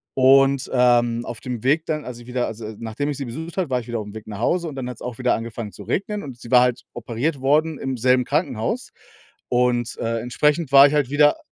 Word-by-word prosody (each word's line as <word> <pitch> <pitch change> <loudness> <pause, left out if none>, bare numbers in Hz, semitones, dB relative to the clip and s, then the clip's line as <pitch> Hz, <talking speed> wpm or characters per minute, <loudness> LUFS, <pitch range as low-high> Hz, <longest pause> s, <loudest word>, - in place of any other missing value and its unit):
Und, 135 0 +4
ähm, 120 -1 +3
auf 120 - -7
dem 125 -3 -6
Weg 155 +5 +2
dann, 155 -2 -2
als 120 -1 -7
ich 120 - -14
wieder 125 0 -1
also 110 -1 -7
nachdem 115 +5 -4
ich 145 - -2
sie 140 - -4
besucht 160 +8 -7
habe, 180 -6 -1
war 125 -1 +1
ich 120 - -10
wieder 120 -1 -3
auf'm 105 0 -8
Weg 110 0 -9
nach 105 -1 -7
Hause 170 +7 0
und 150 - -7
dann 125 -2 -4
hat‘s 125 - -9
auch 125 -2 -6
wieder 125 -1 +2
angefangen 115 -2 -6
zu - - -11
regnen 205 +1 -2
und 130 -4 -8
sie 120 - -11
war 125 - +8
halt 125 -1 +1
operiert 120 +5 -3
worden 150 +3 +2
im 135 -1 -3
selben 125 +1 +3
Krankenhaus. 145 - -2 0.6
Und, 120 -1 +1
äh, 115 0 -1
entsprechend 150 +4 0
war 140 +1 +10
ich 145 - -2
halt 145 -4 +1
wieder 145 0 +4
125 Hz, 240 wpm, -22 LUFS, 120-145 Hz, 0.6 s, war